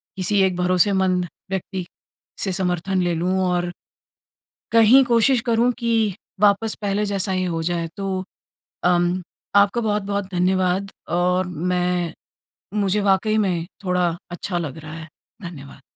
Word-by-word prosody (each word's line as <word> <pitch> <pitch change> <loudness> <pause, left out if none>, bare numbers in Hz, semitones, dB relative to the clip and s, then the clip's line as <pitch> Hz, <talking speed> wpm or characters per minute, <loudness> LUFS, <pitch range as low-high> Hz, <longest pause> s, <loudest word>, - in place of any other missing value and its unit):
किसी 195 +2 0
एक 190 -1 +2
भरोसेमंद 185 0 +2 0.2
व्यक्ति 190 -1 -3 0.6
से 195 - 0
समर्थन 180 +1 0
ले 175 -1 +1
लूँ। 175 +3 0 0.2
और 175 0 0 1.0
कहीं 230 +4 +7
कोशिश 240 +1 +3
करूँ 235 +1 +3
कि 225 -4 +1 0.3
वापस 210 +1 +3
पहले 205 +1 0
जैसा 195 -1 -1
ये 185 0 0
हो 165 -2 -2
जाए, 170 0 -1
तो 190 -1 -2 0.6
अम, 175 +1 +2 0.3
आपका 200 +4 +4
बहुत-बहुत 205 -2 -1
धन्यवाद 185 +2 +1 0.2
और 180 +1 +1
मैं 180 0 -1 0.6
मुझे 205 0 +1
वाक़ई 200 +2 +2
में 180 -5 0 0.2
थोड़ा 180 -1 +1 0.2
अच्छा 175 +1 -3
लग 160 -3 -4
रहा 155 -1 -9
है। 165 0 -8 0.3
धन्यवाद। 145 -7 -9
185 Hz, 130 wpm, -22 LUFS, 175-205 Hz, 1.0 s, कहीं